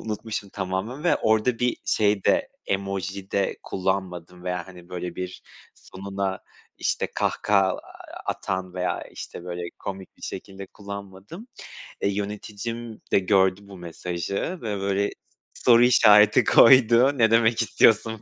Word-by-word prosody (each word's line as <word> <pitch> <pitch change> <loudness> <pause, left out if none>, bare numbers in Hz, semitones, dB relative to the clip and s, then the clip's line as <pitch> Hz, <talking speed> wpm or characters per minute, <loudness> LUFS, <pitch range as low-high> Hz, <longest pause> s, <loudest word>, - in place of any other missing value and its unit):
unutmuşum 105 -1 -5
tamamen 100 - -4
ve 175 - +4
orada 110 +2 +1
bir 125 0 0
şey 105 -2 +1
de 285 -1 +2 0.2
emoji 95 0 -3
de 100 -1 0
kullanmadım 90 -2 -3
veya, 90 0 -3
hani, 90 -2 -14
böyle, 90 -1 -6
bir 90 0 -6 0.3
sonuna, 95 0 -5 0.4
işte, - - -1
kahkaha 100 -2 +2
a 95 - -2 0.5
atan 95 -1 -3
veya, 90 0 -2
işte, 85 - -9
böyle, 90 -1 -5 0.2
komik 95 -1 -8
bir - - -23
şekilde 95 0 -7
kullanmadım. 100 - -10 0.6
E, - - +1
yöneticim 105 +3 -5
de - - +5
gördü 95 0 +2
bu 100 -1 -12
mesajı 85 +1 -5 0.3
ve 105 -3 -3
böyle 100 +1 0 0.4
soru 120 -1 +5
işareti 105 -4 +6
koydu, 130 +2 +6
ne 115 -2 +4
demek 115 0 +3
istiyorsun 110 0 +3
100 Hz, 130 wpm, -24 LUFS, 95-110 Hz, 0.6 s, işareti